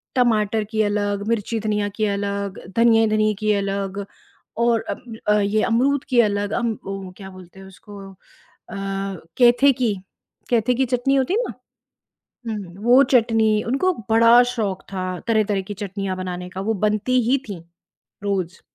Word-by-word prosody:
टमाटर 220 Hz, -3 st, +2 dB
की 220 Hz, -1 st, +1 dB
अलग, 205 Hz, -1 st, -1 dB
मिर्ची-धनिया 215 Hz, -2 st, -1 dB
की 215 Hz, -, +1 dB
अलग, 200 Hz, -1 st, -3 dB, 0.2 s
धनिये 225 Hz, -1 st, +5 dB
धनिये 215 Hz, 0 st, +2 dB
की 215 Hz, -, +3 dB
अलग 200 Hz, 0 st, -2 dB, 0.5 s
और 235 Hz, -1 st, +2 dB
अम 235 Hz, -2 st, -6 dB
अ, 210 Hz, -, +5 dB
ये 205 Hz, +2 st, +1 dB
अमरूद 265 Hz, +4 st, +1 dB
की 250 Hz, -2 st, +3 dB
अलग 205 Hz, -2 st, -1 dB
अम, 235 Hz, -3 st, -1 dB
वो 195 Hz, -1 st, -6 dB
क्या 190 Hz, -2 st, -9 dB
बोलते 185 Hz, 0 st, -14 dB
हैं 190 Hz, -, -12 dB
उसको 200 Hz, +2 st, -13 dB
अ, -, -, -22 dB, 1.2 s
कैथे 245 Hz, +3 st, +6 dB
की 240 Hz, -4 st, 0 dB, 0.6 s
कैथे 240 Hz, +1 st, +2 dB
की 265 Hz, +2 st, +1 dB
चटनी 250 Hz, +2 st, +1 dB
होती 270 Hz, +6 st, +1 dB
है 450 Hz, -, +2 dB
ना? -, -, -5 dB, 1.0 s
हुँ, 200 Hz, -6 st, -5 dB
वो 245 Hz, +4 st, +6 dB
चटनी, 225 Hz, -3 st, +3 dB
उनको 275 Hz, +10 st, +1 dB, 0.2 s
बड़ा 230 Hz, +2 st, +7 dB
शौक 205 Hz, -6 st, -3 dB
था 190 Hz, -1 st, -3 dB, 0.3 s
तरह-तरह 215 Hz, -3 st, +2 dB
की 205 Hz, -, -4 dB
चटनियाँ 195 Hz, -1 st, -4 dB
बनाने 180 Hz, -1 st, -5 dB
का, 185 Hz, -, -6 dB
वो 220 Hz, +3 st, -1 dB
बनती 215 Hz, +4 st, +2 dB
ही 270 Hz, -, +5 dB
थीं, 195 Hz, -5 st, -6 dB, 0.6 s
रोज़। 190 Hz, -3 st, -2 dB
215 Hz, 155 wpm, -22 LUFS, 200-235 Hz, 1.2 s, बड़ा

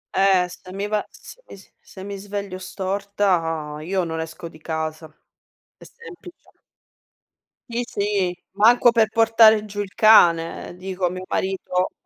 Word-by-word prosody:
Eh, 190 Hz, -2 st, +3 dB
se 185 Hz, +1 st, -13 dB
mi 200 Hz, +1 st, -3 dB
va, 210 Hz, 0 st, 0 dB
se -, -, -14 dB
is 195 Hz, -, -12 dB, 0.3 s
se 190 Hz, -, -10 dB
mi 200 Hz, 0 st, -6 dB
sveglio 200 Hz, -2 st, -6 dB
storta, 185 Hz, -5 st, -2 dB
io 185 Hz, +3 st, -1 dB
non 160 Hz, -1 st, -4 dB
esco 165 Hz, +1 st, -7 dB
di 155 Hz, -1 st, -15 dB
casa. 160 Hz, 0 st, -4 dB, 0.7 s
È -, -, -23 dB
semplice. 365 Hz, -6 st, -14 dB, 1.2 s
Sì, 235 Hz, +1 st, -2 dB
sì, 195 Hz, -3 st, -2 dB
manco 230 Hz, +4 st, +5 dB
per 225 Hz, -2 st, +3 dB
portare 225 Hz, -1 st, +5 dB
giù 205 Hz, -1 st, -8 dB
il 200 Hz, -2 st, -4 dB
cane. 175 Hz, -7 st, +4 dB
Ehm, -, -, -11 dB
dico 185 Hz, 0 st, -4 dB
a 175 Hz, -, +2 dB
mio 185 Hz, +1 st, -7 dB
marito: 185 Hz, -1 st, -1 dB
195 Hz, 150 wpm, -22 LUFS, 180-210 Hz, 1.2 s, manco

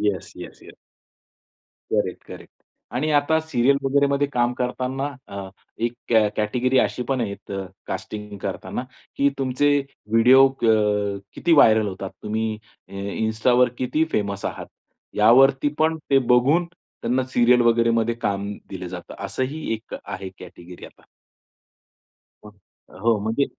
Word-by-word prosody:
Yes, 100 Hz, -4 st, -2 dB
yes, -, -, -10 dB
yes. -, -, -14 dB, 1.2 s
Correct correct -, -, -3 dB, 0.4 s
आणि 150 Hz, +5 st, 0 dB
आता 150 Hz, +2 st, +3 dB
serial 140 Hz, -3 st, +2 dB
वगैरेमध्ये 140 Hz, +1 st, +2 dB
काम 120 Hz, 0 st, +1 dB
करतांना 130 Hz, +2 st, -2 dB, 0.2 s
अ, 100 Hz, -1 st, -7 dB, 0.3 s
एक 120 Hz, +1 st, -1 dB, 0.2 s
कॅ 110 Hz, -2 st, +4 dB
कॅटेगरी 125 Hz, +5 st, +1 dB
अशी 125 Hz, -, 0 dB
पण 130 Hz, -2 st, +1 dB
आहेत 100 Hz, -2 st, -6 dB, 0.4 s
कास्टिंग 105 Hz, -1 st, -6 dB
करताना 125 Hz, -, -4 dB, 0.3 s
की 140 Hz, 0 st, +4 dB
तुमचे 135 Hz, +2 st, +1 dB, 0.4 s
व्हिडिओ 130 Hz, +4 st, +7 dB
अ, 105 Hz, -5 st, +1 dB, 0.2 s
किती 170 Hz, -1 st, +1 dB
व्हायरल 110 Hz, -7 st, +5 dB
होतात? 95 Hz, 0 st, -6 dB
तुम्ही 110 Hz, 0 st, -2 dB, 0.3 s
अ, -, -, -19 dB
इन्स्टावर 110 Hz, +5 st, +1 dB
किती 155 Hz, +5 st, 0 dB
फेमस 100 Hz, -1 st, -2 dB
आहात? -, -, -5 dB, 0.5 s
यावरती 130 Hz, +6 st, +5 dB
पण 160 Hz, +1 st, +2 dB
ते 135 Hz, -, +6 dB, 0.2 s
बघून 145 Hz, +8 st, +3 dB
त्यांना 130 Hz, -6 st, -4 dB
सीरियल 120 Hz, 0 st, +5 dB
वगैरेमध्ये 115 Hz, 0 st, +2 dB
काम 100 Hz, -3 st, -2 dB, 0.2 s
दिलं 90 Hz, -2 st, -6 dB
जातं. 90 Hz, -1 st, -8 dB
असंही 140 Hz, +5 st, -4 dB
एक 110 Hz, 0 st, -8 dB
आहे 95 Hz, -, -6 dB
कॅटेगरी 90 Hz, -1 st, -11 dB
आता. -, -, -18 dB, 1.5 s
हं, 100 Hz, -2 st, -21 dB
हो, 115 Hz, -1 st, +2 dB
म्हणजे 110 Hz, +6 st, 0 dB
120 Hz, 125 wpm, -23 LUFS, 105-135 Hz, 1.5 s, व्हिडिओ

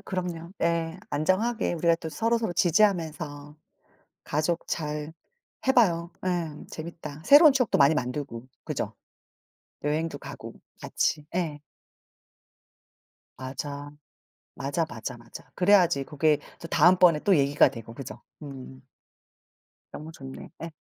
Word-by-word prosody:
그럼요. 175 Hz, -2 st, -5 dB
예. 170 Hz, +1 st, 0 dB
안정하게 185 Hz, +11 st, +1 dB
우리가 170 Hz, 0 st, +3 dB
또 165 Hz, -1 st, -6 dB
서로서로 225 Hz, +2 st, 0 dB
지지하면서 160 Hz, -6 st, +1 dB, 0.7 s
가족 155 Hz, +3 st, -1 dB
잘 150 Hz, -1 st, -3 dB, 0.5 s
해 265 Hz, -, +5 dB
봐요. 170 Hz, -7 st, +3 dB, 0.2 s
예. 170 Hz, -4 st, -1 dB
재밌다. 155 Hz, -2 st, -8 dB
새로운 295 Hz, +2 st, +9 dB
추억도 255 Hz, -4 st, +1 dB
많이 140 Hz, +2 st, +6 dB
만들고 125 Hz, -3 st, -4 dB, 0.2 s
그죠. -, -, -3 dB, 0.9 s
여행도 155 Hz, +3 st, -1 dB
가고 -, -, -9 dB, 0.3 s
같이. 150 Hz, -2 st, -1 dB
예. 160 Hz, -5 st, -1 dB, 1.8 s
맞아. 140 Hz, +2 st, -6 dB, 0.6 s
맞아, 145 Hz, +4 st, -1 dB
맞아, 120 Hz, -3 st, -6 dB
맞아. 120 Hz, -, -13 dB
그래야지 180 Hz, -7 st, +4 dB
그게 150 Hz, 0 st, +2 dB, 0.2 s
또 -, -, -7 dB
다음번에 170 Hz, -1 st, +5 dB
또 195 Hz, -3 st, +4 dB
얘기가 140 Hz, 0 st, +4 dB
되고 115 Hz, -3 st, -10 dB
그죠. 135 Hz, +1 st, -8 dB, 0.2 s
음. 130 Hz, -, -9 dB, 1.1 s
너무 155 Hz, +2 st, -8 dB
좋네. 135 Hz, -3 st, -10 dB
예. 165 Hz, -, -5 dB
160 Hz, 245 characters per minute, -27 LUFS, 145-175 Hz, 1.8 s, 새로운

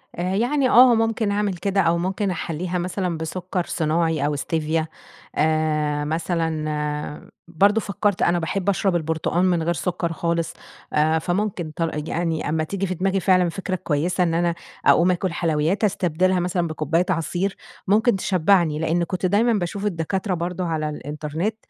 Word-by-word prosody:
آآ، 180 Hz, +2 st, -1 dB
يعني 255 Hz, +5 st, +2 dB
آه 245 Hz, 0 st, +7 dB
ممكن 225 Hz, -1 st, +1 dB
أعمل 205 Hz, -1 st, 0 dB
كده 195 Hz, +3 st, +1 dB
أو 170 Hz, -1 st, +2 dB
ممكن 190 Hz, +3 st, -1 dB
أحَلّيها 175 Hz, +1 st, -3 dB
مثلًا 180 Hz, -1 st, -2 dB
بسكر 175 Hz, +2 st, -3 dB
صناعي 160 Hz, -2 st, 0 dB
أو 145 Hz, 0 st, 0 dB
Stevia 160 Hz, +1 st, -1 dB, 0.5 s
آآ، 155 Hz, -1 st, +1 dB
مثلًا 155 Hz, -2 st, -2 dB, 0.2 s
برضه 205 Hz, +6 st, +3 dB
فكرت 200 Hz, -1 st, -1 dB
أنا 175 Hz, 0 st, +3 dB
باحب 185 Hz, +4 st, -1 dB
أشرب 195 Hz, -1 st, +1 dB
البرتقان 160 Hz, +2 st, 0 dB
من 175 Hz, -3 st, +2 dB
غير 170 Hz, +1 st, +1 dB
سكر 175 Hz, -1 st, -2 dB
خالص، 170 Hz, 0 st, -1 dB, 0.4 s
آآ، 155 Hz, +2 st, +3 dB
فممكن 175 Hz, -1 st, -2 dB
طر 165 Hz, -1 st, -1 dB
آآ، 150 Hz, -, -3 dB
يعني 165 Hz, -2 st, -1 dB
أما 155 Hz, +1 st, 0 dB
تيجي 195 Hz, +4 st, -3 dB
في 185 Hz, -, -2 dB
دماغي 195 Hz, +2 st, 0 dB
فعلًا 180 Hz, -1 st, +3 dB
فكرة 190 Hz, +2 st, -3 dB
كويسة 175 Hz, +2 st, 0 dB
إن 165 Hz, -2 st, 0 dB
أنا 170 Hz, 0 st, +1 dB, 0.3 s
أقوم 175 Hz, +2 st, +5 dB
آكل 180 Hz, 0 st, -1 dB
حلويات، 165 Hz, +4 st, 0 dB
أستبدلها 185 Hz, -2 st, +1 dB
مثلًا 175 Hz, -1 st, 0 dB
بكُباية 155 Hz, +2 st, 0 dB
عصير، 180 Hz, +3 st, -1 dB, 0.3 s
ممكن 220 Hz, +4 st, +3 dB
تشبعني. 180 Hz, -4 st, +2 dB
لأني 165 Hz, +2 st, +1 dB
كنت 185 Hz, +1 st, -3 dB
دايمًا 220 Hz, +6 st, +3 dB
باشوف 200 Hz, 0 st, -2 dB
الدكاترة 190 Hz, +1 st, -1 dB
برضه 180 Hz, +1 st, -3 dB
على 155 Hz, -2 st, -1 dB
الإنترنت، 150 Hz, -, -4 dB
175 Hz, 160 wpm, -23 LUFS, 160-190 Hz, 0.5 s, آه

